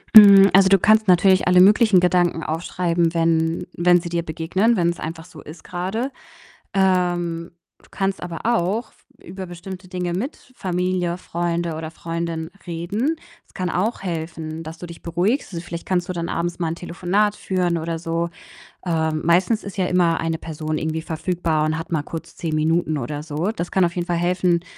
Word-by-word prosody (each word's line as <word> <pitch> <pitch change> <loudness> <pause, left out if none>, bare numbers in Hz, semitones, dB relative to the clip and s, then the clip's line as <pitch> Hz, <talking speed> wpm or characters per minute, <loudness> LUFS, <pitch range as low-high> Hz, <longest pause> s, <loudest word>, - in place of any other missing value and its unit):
Mhm, 200 -2 +10
also, 190 0 +6
du 195 0 +6
kannst 215 +3 +4
natürlich 185 +1 +4
alle 180 0 +6
möglichen 210 0 +6
Gedanken 175 -2 +2
aufschreiben, 170 +1 -1
wenn 165 0 +1
wenn 175 +1 +4
sie 170 - -6
dir 170 0 -1
begegnen, 175 +8 +1
wenn's 170 -1 +1
einfach 160 +1 -6
so 160 -4 -13
ist 160 +2 -12
grade. 190 +9 -3 0.6
Ähm, 175 -3 +1 0.3
du - - -22
kannst 195 -1 -2
aber 170 -2 -5
auch 225 0 0
f - - -30 0.2
über 190 +2 -7
bestimmte 185 +2 -9
Dinge 180 -1 -3
mit 255 - -5
Familie, 180 -3 -1
Freunde 170 -1 -2
oder 160 0 -5
Freundin 165 0 -4 0.2
reden. 200 - -1 0.3
Das - - -28
kann 185 -1 -3
auch 200 +7 -1
helfen, 160 -2 -4
dass 160 +1 -9
du 175 - -7
dich 170 0 -11
beruhigst. 185 - -1
Also, 170 0 -5
vielleicht 170 -1 -7
kannst 180 -2 0
du - - -1
dann 170 -1 -3
abends 175 +1 -3
mal 170 - 0
'n 165 - -4
Telefonat 185 +4 0
führen 180 -4 -1
oder 165 0 -3
so. 165 +1 -2 0.6
Ähm, 160 -3 0
meistens 180 +7 +3
ist 200 0 -8
ja 185 - +2
immer 175 -2 +2
eine 165 0 -2
Person 155 -1 -4
irgendwie 160 0 -2
verfügbar 160 -1 -1
und 155 +1 0
hat 165 +1 -7
mal 155 -3 +1
kurz 165 +2 -8
10 160 -2 -2
Minuten 160 0 +1
oder 145 +3 -4
so. 160 +6 -2
Das 175 -4 -4
kann 190 - +3
auf 170 0 -1
jeden 175 -2 -2
Fall 175 - +1
helfen, 175 0 +1
175 Hz, 185 wpm, -22 LUFS, 165-185 Hz, 0.6 s, Mhm